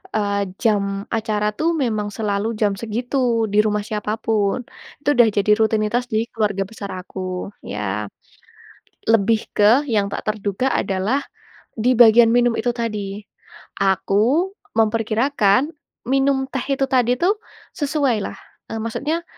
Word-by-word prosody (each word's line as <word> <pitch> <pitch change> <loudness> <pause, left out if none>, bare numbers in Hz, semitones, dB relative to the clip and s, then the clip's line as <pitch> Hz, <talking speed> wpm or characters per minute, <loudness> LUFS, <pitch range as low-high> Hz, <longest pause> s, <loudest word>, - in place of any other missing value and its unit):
eee, 200 -1 0 0.2
jam 200 -3 +1
acara 215 -1 -1
tuh 325 - +1
memang 215 -4 -1
selalu 205 -1 -1
jam 205 -2 +3
segitu, 235 +4 -3 0.4
di - - +2
rumah 210 -1 0
siapa 210 -1 -3
pun. 220 +2 0 0.4
Itu 290 - 0
dah 235 -2 +7
jadi 205 +1 +3
rutinitas 220 +2 +1
di - - +3 0.2
keluarga 205 -3 0
besar 205 -3 -7
aku, 185 +1 -6
ya. 105 0 -4 1.0
Lebih 225 0 +3 0.2
ke 205 0 +5 0.3
yang 205 -2 +2
tak - - -3
terduga 210 +2 -1
adalah 200 +8 0 0.6
di 245 - +3
bagian 230 0 +8
minum 245 -1 +3
itu 240 +2 +1
tadi. 210 -3 -4 0.6
Aku 215 - +2 0.3
memperkirakan 225 +3 +2 0.4
minum 270 0 +3
teh 270 - -3
itu 270 - -1
tadi 250 -1 +3
tuh 365 +4 +4 0.5
sesuailah. 280 -8 0 0.4
Eee, 225 - -3
maksudnya, 300 +9 -2
215 Hz, 130 wpm, -21 LUFS, 200-245 Hz, 1.0 s, bagian